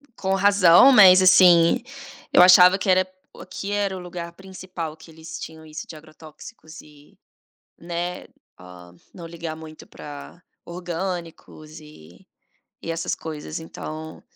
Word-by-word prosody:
com 190 0 -2
razão, 200 +3 +5
mas 190 -7 +7
assim, 180 -1 +5 0.5
eu - - +5
achava 180 +1 +7
que 200 - -4
era 185 0 +2 0.3
aqui 200 - -8
era 200 -2 -2
o - - -8
lugar 175 -1 -8
principal 185 -4 -9
que 160 +1 -18
eles 160 0 -11
tinham 160 0 -11
isso 155 0 -10
de - - -11
agrotóxicos 155 +3 -15
e, 150 -1 -21 0.6
né, 175 +1 -6 0.9
não 170 -2 -10
ligar 165 -1 -8
muito 155 -1 -13
para 145 +4 -12 0.2
orgânicos 170 -3 -8
e 90 - -18 0.5
e 165 - -5
essas 165 0 -4
coisas 155 0 -8
então 160 -1 -10
170 Hz, 130 wpm, -22 LUFS, 160-185 Hz, 0.9 s, mas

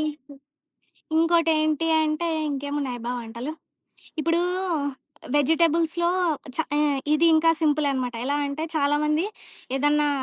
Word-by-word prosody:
ఇంకో 300 -2 -5 0.8
ఇంకోటేంటి 325 -1 +2 0.2
అంటే, 310 +2 -1 0.2
ఇంకేమున్నాయబ్బా 275 -4 -3
వంటలు! 235 +5 -6 0.7
ఇప్పుడూ, 330 +2 +1 0.9
వెజిటబుల్స్‌లో 330 +3 +2 0.5
చా 320 - 0
ఏ - - +2 0.3
ఇది 310 +2 +3
ఇంకా 320 +1 +4
సింపులె 300 -2 +2
అనమాట. 250 -2 -2
ఎలా 285 +2 0
అంటే 280 +3 -4
చాలామంది 300 +3 +1 0.5
ఏదన్నా 295 +2 +2
300 Hz, 100 wpm, -24 LUFS, 285-325 Hz, 0.9 s, ఇంకా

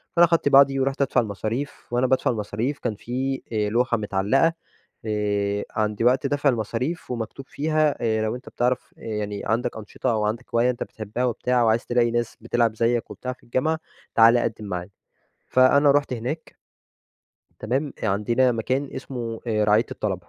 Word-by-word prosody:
فأنا 175 0 +7
أخدت 165 -3 +2
بعضي 135 -1 +6
ورُحت 135 +1 0
أدفع 130 -2 +3
المصاريف، 110 +6 -4
وأنا 125 +1 +2
بادفع 130 0 +2
المصاريف 115 +5 -3
كان 115 -4 -2
في 130 +5 -3
آآ 105 -1 +1
لوحة 120 +2 +1
متعلقة، 105 +10 +2 0.5
آآ، 105 -1 -1
عند 105 0 -1
وقت 130 +3 +3
دَفع 145 0 +2
المصاريف، 125 - -2
ومكتوب 125 +3 -5
فيها 155 0 +1
آآ 110 -2 +1
لو 110 +2 -1
أنتَ 125 - -10
بتعرف 125 0 -1
آآ - - -18
يعني 105 -2 -4
عندك 115 +1 -1
أنشطة، 110 +3 -3
أو 110 -2 0
عندك 115 +3 -2
هواية 120 +2 +4
أنتَ 120 - -4
بتحبها 110 +3 -4
وبتاع، 125 +1 +1
وعايز 115 +1 +2
تلاقي 120 -1 +2
ناس 120 -1 -2
بتلعب 115 -1 +1
زيّك 115 +1 0
وبتاع 125 0 -5
في - - -24
الجامعة، 155 +7 0 0.4
تعالَ 115 +1 +7
قدّم 110 -2 -3
معانا، 90 -2 -4 0.6
فأنا 140 +3 +5
رُحت 145 -1 +2
هناك، 125 +7 -5 1.0
تمام؟ 135 +7 -1
آآ - - +2
عندنا 115 +6 +2
مكان 130 +5 -1
اسمه 115 -4 -5
آآ 105 -2 +1
رعاية 105 +2 +3
الطلبة 95 -4 -4
120 Hz, 170 wpm, -24 LUFS, 110-130 Hz, 1.0 s, فأنا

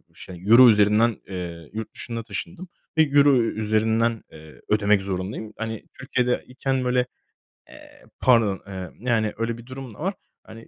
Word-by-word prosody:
şey 90 -2 -11
Euro 120 +2 +9
üzerinden. 105 +2 +4
Eee, 85 -4 -7
yurt 110 0 -6
dışına 115 -1 -5
taşındım 180 +9 -7 0.3
ve 160 - +7
Euro 145 -1 +5
üzerinden, 110 +1 0
eee, 80 -1 -14
ödemek 105 -1 +3
zorundayım. 100 +3 -4
Hani, 110 -1 -5 0.2
Türkiye'de 125 -2 0
iken 130 0 -2
böyle, 125 0 +2 0.6
eee, - - -16 0.2
pardon, 115 -6 +3
eee, 95 -3 -7
yani 115 -3 0
öyle 115 +1 -2
bir 120 - -12
durum 130 -2 -9
da - - -18
var. 190 +5 -1 0.3
Hani 115 +1 -13
115 Hz, 150 wpm, -24 LUFS, 105-125 Hz, 0.6 s, Euro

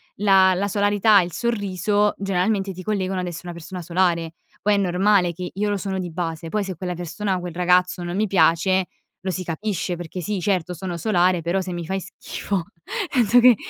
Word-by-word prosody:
la 190 -2 +5
la 200 +3 0
solarità, 205 +1 +4
il 175 0 -4
sorriso, 205 -1 0
generalmente 195 +1 0
ti 185 - -8
collegano 190 -1 -1
ad 180 - -3
essere 175 +1 -7
una 170 - -7
persona 180 +2 -7
solare. 170 -1 +1 0.3
Poi 210 - +2
è - - +3
normale 185 -1 +2
che 180 +1 -6
io 205 +2 -1
lo 205 - 0
sono 190 -1 -3
di 180 -2 -4
base. 165 -1 -4
Poi 210 +4 0
se 190 -2 -5
quella 180 +1 -4
persona 185 +3 -2
o - - -2
quel 175 -1 -6
ragazzo 180 +1 +2
non 175 0 -4
mi 210 +2 +2
piace, 185 -1 +3 0.4
lo 190 +1 -2
si 185 0 -3
capisce 180 +1 -2
perché 175 +1 -7
sì, 205 +2 -2
certo, 180 -2 0
sono 175 0 -5
solare, 180 -2 +2
però 170 +4 0
se 185 0 -5
mi 175 -1 -4
fai 190 +3 -2
schifo 195 -1 -4 0.5
penso 245 -2 +4
che, 245 0 +7
185 Hz, 205 wpm, -23 LUFS, 175-200 Hz, 0.5 s, che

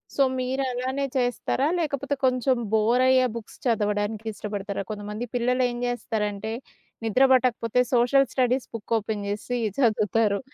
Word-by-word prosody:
So 280 - +4 0.2
మీరలానే 260 +1 -1
చేస్తారా? 250 +2 0
లేకపోతే 285 -3 -1
కొంచెం 255 0 +2 0.2
బోరయ్యే 255 +4 +4
బుక్స్ 225 -2 -9
చదవడానికి 210 -1 0
ఇష్టపడతారా? 200 -1 -4
కొంతమంది 210 +2 -5
పిల్లలేం 245 0 +1
జేస్తారంటే 220 -3 -2 0.5
నిద్ర 225 +4 +3
బట్టకపోతే 250 -2 +2
సోషల్ 250 +2 +4
స్టడీస్ 255 0 +1
బుక్ 230 0 -4
ఓపెన్ 210 -1 -3
జేసి 210 +4 -3 0.2
చదువుతారు. 215 -3 +2
240 Hz, 115 wpm, -25 LUFS, 210-255 Hz, 0.5 s, So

